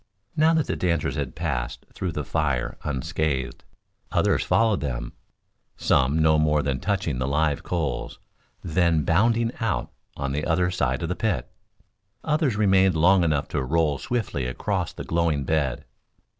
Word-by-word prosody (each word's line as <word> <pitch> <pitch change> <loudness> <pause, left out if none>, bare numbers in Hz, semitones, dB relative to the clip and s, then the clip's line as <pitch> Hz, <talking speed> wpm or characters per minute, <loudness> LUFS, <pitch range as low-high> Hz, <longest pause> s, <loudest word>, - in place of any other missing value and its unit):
Now 160 +1 +4
that 160 -3 +2
the - - -2
dancers 85 -4 0
had 70 -3 -3
passed 70 -7 -3
through 90 -3 -3
the 75 - -3
fire 70 -5 -1
unscathed, 70 0 -2 0.5
others - - +2
followed 110 -3 +2
them, - - -4 0.6
some 70 +3 +2
no 80 -1 +4
more 75 -1 +2
than 70 -3 -1
touching 85 -9 -1
the 65 - -1
live 75 0 +1
coals, 80 -8 -3 0.5
then 85 -2 +2
bounding 115 +8 +2
out 115 -4 -1 0.3
on 70 0 -2
the 75 +2 -2
other 90 +2 +1
side 65 -5 -1
of 85 - -2
the 90 - -1
pit; 110 -2 -2 0.7
others 150 -6 +1
remaining 95 -2 +4
long 90 +3 +4
enough 75 -4 +1
to - - -1
roll 75 +1 +1
swiftly 110 - -2
across 60 - -2
the - - -8
glowing 80 -4 0
bed. 70 -4 -1
80 Hz, 155 wpm, -25 LUFS, 70-95 Hz, 0.7 s, Now